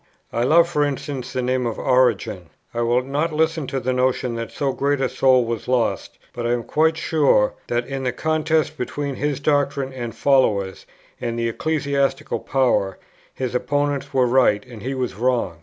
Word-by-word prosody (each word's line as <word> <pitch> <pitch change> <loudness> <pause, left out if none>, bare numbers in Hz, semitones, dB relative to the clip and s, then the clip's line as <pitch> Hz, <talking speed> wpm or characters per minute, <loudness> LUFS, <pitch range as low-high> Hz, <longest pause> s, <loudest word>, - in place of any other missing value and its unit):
I 115 - 0
love, 170 +5 +5
for 150 -4 +1
instance, 140 -2 -3
the 130 -1 -2
name 125 0 0
of 115 - -4
Origen: 110 -8 +1 0.2
I 120 - -1
will 120 +2 +2
not 145 +5 -1
listen 160 -1 0
to 135 - -2
the 130 +1 -1
notion 125 -1 0
that 115 0 -5
so 140 -2 -1
great 140 +1 0
a 135 - +1
soul 130 -1 +3
was 115 -2 -4
lost; 125 -2 0 0.2
but 120 -1 -3
I 120 - +2
am 120 -1 -1
quite 160 +6 +2
sure 145 -11 +2
that, 120 0 -1
in 135 +1 -4
the 125 - 0
contest 155 +2 0
between 140 +3 -3
his 145 -1 -1
doctrine 140 -2 0
and 120 -4 -5
followers 105 -9 +1 0.3
and 115 -1 -2
the 115 0 0
ecclesiastical 140 0 -1
power, 125 -8 +1 0.3
his 130 -2 -4
opponents 145 +2 -1
were 130 -2 +3
right, 120 -5 +3
and 120 -4 -11
he 135 +4 -3
was 125 -4 -2
wrong. 115 -6 0
130 Hz, 185 wpm, -22 LUFS, 120-145 Hz, 0.3 s, love